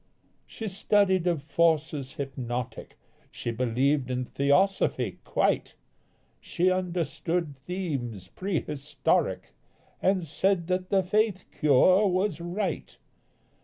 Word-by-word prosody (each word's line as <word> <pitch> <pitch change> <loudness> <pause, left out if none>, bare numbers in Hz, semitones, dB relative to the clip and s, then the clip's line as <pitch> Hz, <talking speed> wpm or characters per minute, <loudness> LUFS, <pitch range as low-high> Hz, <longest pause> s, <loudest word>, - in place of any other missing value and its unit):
She 220 - -6
studied 190 -2 +2
of 165 -5 0
forces 155 -4 +1
hypnotic, 125 -3 -5 0.3
She 120 - -4
believed 130 +3 +1
in 125 0 -1
theosophy 140 - +1
quite, - - 0 0.6
She 185 +2 +1
understood 175 -3 -1
themes 140 - -4
prehistoric 150 -6 -1 0.5
And 190 -2 +2
said 175 +3 +1
that 185 0 -1
the 195 -1 +3
faith 210 0 +1
cure 180 +8 +4
was 185 -1 0
right. 175 +1 -3
170 Hz, 95 wpm, -27 LUFS, 135-185 Hz, 0.6 s, cure